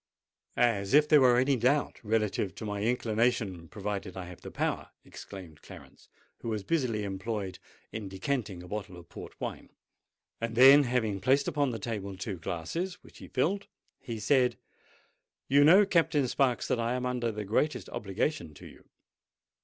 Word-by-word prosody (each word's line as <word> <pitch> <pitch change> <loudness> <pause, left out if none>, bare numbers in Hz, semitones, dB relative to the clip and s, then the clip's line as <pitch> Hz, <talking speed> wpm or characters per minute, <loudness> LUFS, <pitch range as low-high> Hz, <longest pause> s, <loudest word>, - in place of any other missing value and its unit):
"As 110 -3 +2
if 150 0 +6
there 150 -2 +6
were 125 -2 +6
any 135 +2 +3
doubt 130 +5 +1
relative 105 -4 0
to 110 - -7
my 105 -1 -3
inclination, 110 -5 0
provided 100 -2 -5
I 95 - -5
have 90 -1 -11
the - - -8
power," - - -2 0.2
exclaimed 90 -6 -11
Clarence, - - -14 0.3
who 115 - -5
was 105 -3 -2
busily 125 -9 0
employed 100 0 -4 0.3
in 105 -3 -6
decanting 95 -2 -3
a - - -11
bottle 95 -2 -6
of 85 -1 -14
port - - -10
wine: - - -6 0.7
then, 130 +5 +7
having 110 -6 -1
placed 135 +4 +3
upon 145 -5 +1
the 115 - -3
table 100 -3 -5
two 95 -1 -5
glasses, 125 - -3
which - - -16
he - - -10
filled, 195 +10 -1 0.3
he 115 -2 -6
said, 125 +3 +2 0.9
"You 140 +2 +5
know, 185 +7 +7
Captain 165 -7 +2
Sparks, 125 0 +1
that 120 - 0
I 115 +1 0
am 125 0 -2
under 125 -2 -1
the 105 -1 -5
greatest 120 +1 0
obligation 100 - -3
to - - -13
you. - - -15
115 Hz, 165 wpm, -29 LUFS, 100-135 Hz, 0.9 s, then